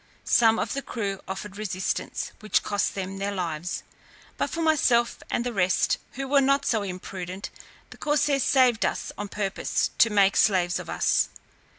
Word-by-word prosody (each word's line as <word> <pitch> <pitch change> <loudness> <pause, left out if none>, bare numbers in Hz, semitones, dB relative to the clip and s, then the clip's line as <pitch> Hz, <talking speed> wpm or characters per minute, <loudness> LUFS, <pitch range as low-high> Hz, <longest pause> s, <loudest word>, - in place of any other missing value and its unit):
Some 225 -1 +4
of - - -2
the 275 - -2
crew 200 -7 -4
offered 195 +1 -6
resistance, 185 -3 -3
which 215 - +1
cost 205 -1 -1
them 195 0 -4
their 200 +1 -1
lives. 175 -3 -3 0.5
But - - -1
for 330 - -3
myself 250 -7 +2
and 235 - -1
the 245 - -2
rest, 185 -2 +2
who 270 +1 -4
were 280 +1 +4
not 275 +1 +2
so 220 -3 +1
imprudent, 185 0 -6 0.4
the - - -11
corsairs 295 -2 +1
saved 250 -3 +4
us - - -1
on 205 - -5
purpose 195 -1 -1
to 230 - +6
make 200 -1 +3
slaves 180 -4 +3
of - - -8
us. - - +2
205 Hz, 170 wpm, -26 LUFS, 190-245 Hz, 0.5 s, to